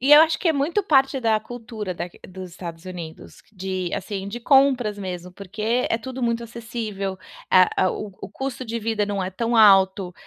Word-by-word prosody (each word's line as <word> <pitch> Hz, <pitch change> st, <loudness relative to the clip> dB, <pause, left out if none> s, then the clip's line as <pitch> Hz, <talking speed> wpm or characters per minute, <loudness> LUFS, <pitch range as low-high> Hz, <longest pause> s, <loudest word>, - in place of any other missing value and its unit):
E 275 Hz, +3 st, +4 dB
eu 300 Hz, -, +11 dB
acho 320 Hz, 0 st, +3 dB
que 350 Hz, -, 0 dB
é -, -, +4 dB
muito 310 Hz, +8 st, 0 dB
parte 270 Hz, -6 st, +3 dB
da 225 Hz, -2 st, +2 dB
cultura 220 Hz, -4 st, -6 dB
daq 175 Hz, +1 st, -7 dB
dos 185 Hz, -1 st, -9 dB
Estados 170 Hz, -1 st, -8 dB
Unidos 170 Hz, -3 st, -9 dB
de, 185 Hz, -2 st, -3 dB
assim, 200 Hz, -2 st, -4 dB
de 235 Hz, -, -5 dB
compras 260 Hz, -6 st, +3 dB
mesmo, 180 Hz, -2 st, -6 dB
porque 215 Hz, +6 st, -2 dB
é 225 Hz, -, +1 dB
tudo 255 Hz, +2 st, -7 dB
muito 235 Hz, 0 st, 0 dB
acessível, 220 Hz, -4 st, -5 dB, 0.3 s
eh, 185 Hz, -1 st, +7 dB, 0.2 s
o 205 Hz, +2 st, -4 dB
o -, -, -5 dB
custo 265 Hz, +1 st, -5 dB
de 230 Hz, +1 st, -3 dB
vida 215 Hz, -2 st, -1 dB
não 200 Hz, -2 st, -2 dB
é 185 Hz, -, -3 dB
tão 230 Hz, +4 st, -1 dB
alto, 195 Hz, -3 st, +5 dB
215 Hz, 195 wpm, -23 LUFS, 190-245 Hz, 0.3 s, eu